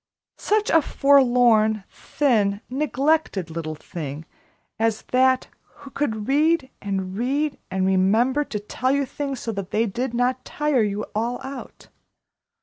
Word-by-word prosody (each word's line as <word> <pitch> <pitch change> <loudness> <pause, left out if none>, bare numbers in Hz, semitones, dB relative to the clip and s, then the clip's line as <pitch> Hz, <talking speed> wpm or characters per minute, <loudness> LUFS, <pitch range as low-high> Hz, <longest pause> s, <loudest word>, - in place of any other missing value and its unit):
Such 425 0 +1
a 325 - +5
forlorn, 245 -7 +4
thin, 210 -8 0
neglected 275 - 0
little 160 -1 -4
thing 155 -2 -7 0.5
as 225 -1 0
that, 260 0 +3 0.2
who 285 -2 -15
could 220 -8 -2
read 295 0 +2
and 190 -2 -3
read 275 +6 -1
and 190 0 0
remember 215 +9 +3
and 215 -8 -4
tell 255 +1 0
you 280 0 +1
things 275 -1 -5
so 230 - -3
that 200 -3 -5
they 225 +2 +1
did 240 +4 -3
not 250 +1 0
tire 295 -4 0
you 210 0 -1
all 235 +3 -1
out! 270 0 -9
245 Hz, 140 wpm, -23 LUFS, 205-275 Hz, 0.5 s, a